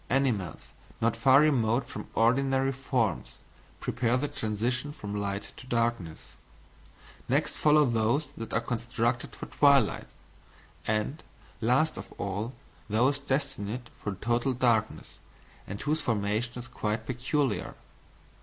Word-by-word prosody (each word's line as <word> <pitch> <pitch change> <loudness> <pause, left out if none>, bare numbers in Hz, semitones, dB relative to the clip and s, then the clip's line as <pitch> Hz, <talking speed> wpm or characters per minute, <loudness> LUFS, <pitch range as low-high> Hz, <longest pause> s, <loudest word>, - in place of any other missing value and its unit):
Animals 125 -9 0 0.3
not 115 +1 +2
far 130 +4 +6
remote 125 -5 +2
from - - -7
ordinary 135 +3 +3
forms, 125 - -1 0.4
prepare 120 +1 +1
the 145 +3 -1
transition 120 +5 -2
from 105 -7 -6
light 100 0 -3
to 125 - -11
darkness. 115 -9 -1 1.0
Next - - +2
follow 150 0 +5
those 120 +4 +1
that 115 - -6
are 115 - +1
constructed 120 0 -1
for - - -7
twilight; 140 -6 +3 0.8
and, 110 +8 0 0.4
last 130 +7 +2
of - - -8
all, 100 +5 -3 0.4
those 125 +7 +2
destined 130 -5 -3
for 105 -2 -3
total 120 +6 0
darkness, 115 -3 0 0.5
and 100 +1 -5
whose 150 +2 0
formation 110 +1 0
is 125 +1 -7
quite 110 -3 -2
peculiar." 125 - -1
120 Hz, 120 wpm, -29 LUFS, 110-135 Hz, 1.0 s, far